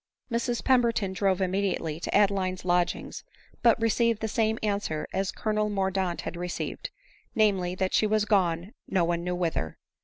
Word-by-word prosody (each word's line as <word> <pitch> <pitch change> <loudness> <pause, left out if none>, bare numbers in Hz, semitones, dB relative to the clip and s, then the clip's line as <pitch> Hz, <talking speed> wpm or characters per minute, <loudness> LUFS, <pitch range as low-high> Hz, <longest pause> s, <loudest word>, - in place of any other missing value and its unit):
Mrs 240 +1 -1
Pemberton 235 -6 +2
drove 190 0 +1
immediately 185 -4 -1
to - - -3
Adeline's 195 -3 +2
lodg 175 -1 +2
ings, - - -8 0.4
but 235 -1 +5
received 230 0 +2
the 220 - -2
same 220 0 +1
answer 200 -7 -1
as 195 0 0
Colonel 215 -1 -1
Mordaunt 190 -3 -1
had - - -5
received; 175 0 -4 0.5
namely, 195 -5 +2
that 185 0 -1
she 215 - +3
was 215 0 +2
gone 185 -2 +1
no 185 -3 +1
one 170 0 -1
knew 180 0 -1
whither. 165 - -2
195 Hz, 160 wpm, -27 LUFS, 180-215 Hz, 0.5 s, but